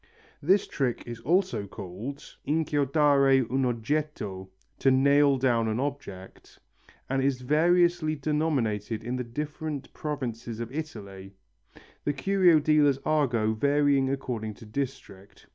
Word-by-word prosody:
This 190 +7 +3
trick 130 -4 -2
is 120 -1 -7
also 175 - 0
called 105 +9 -7 0.2
inchiodare 145 -3 +3
un 135 0 +1
oggetto 115 -6 -3 0.3
(to 135 - +3
nail 140 +1 +4
down 120 -3 +1
an 110 +1 -1
object), 130 -10 -6 0.5
and 135 0 0
is 135 -1 0
variously 170 +3 +2
denominated 130 -8 -1
in 120 +2 -3
the 125 - -2
different 150 +3 -5
provinces 120 -6 -5
of 115 0 -5
Italy, 100 -10 -7 0.7
the 145 - 0
curio 175 +3 +4
dealers' 150 -2 +3
argot 120 -8 +1
varying 140 -1 +3
according 120 -6 -3
to 115 - -13
district. 110 -5 -6
135 Hz, 120 wpm, -27 LUFS, 115-150 Hz, 0.7 s, nail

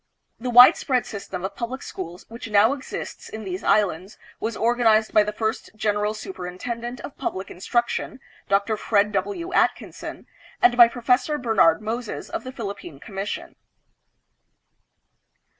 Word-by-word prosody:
The 250 +2 -3
widespread 245 0 +6
system 195 -3 -6
of 190 - -5
public 255 +3 -5
schools 175 0 -7
which 230 0 -8
now 210 +4 +5
exists 275 -2 -7
in 220 0 -7
these 185 -1 -5
islands 195 -2 +1 0.2
was 225 0 -3
organized 225 -2 +3
by 215 - +7
the 210 0 -1
first 220 +1 -3
General 210 0 0
Superintendent 215 +6 -6
of 285 - -8
Pub - - -2
lic 190 +1 -6
Instruction, 235 +7 -1 0.3
Dr. 200 +2 +2
Fred 210 -1 +2
W. 205 - -3
Atkinson, - - -1 0.3
and 365 - +5
by 240 -1 +9
Professor 250 +5 +1
Bernard 215 - +3
Moses 230 +1 -4
of - - -4
the 255 - -6
Philippine 200 - -7
Commission. 195 +1 -6
220 Hz, 140 wpm, -24 LUFS, 200-240 Hz, 0.3 s, by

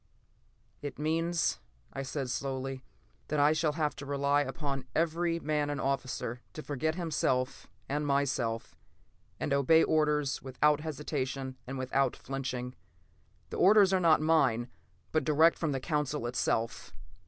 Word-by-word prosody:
"It 145 - -6
means," 165 +3 0 0.3
I 135 - -3
said 135 -1 -3
slowly, 135 0 -3 0.4
"that 150 - -1
I 145 +2 +5
shall 155 -1 +1
have 150 -1 -1
to 140 - -7
rely 140 0 +2
upon 135 -1 -3
every 170 +1 +1
man 150 -2 0
and 145 -1 -2
officer 130 -3 -2
to 155 - -7
forget 155 +3 -1
himself 145 -7 -1 0.2
and 145 +1 -1
myself, 130 -5 0 0.6
and 140 - -1
obey 140 +4 +5
orders 150 -3 +1
without 145 +3 +2
hesitation 135 -3 -3
and 135 +1 -4
without 130 +1 +1
flinching. 130 -2 -4 0.8
The - - -4
orders 195 0 +6
are 190 - +4
not 165 -3 +4
mine, 135 -7 +2 0.4
but 155 -2 +1
direct 155 +3 +4
from 160 -3 0
the 135 - -1
Council 150 -2 -1
itself." 115 -1 -1
145 Hz, 140 wpm, -31 LUFS, 135-155 Hz, 0.8 s, orders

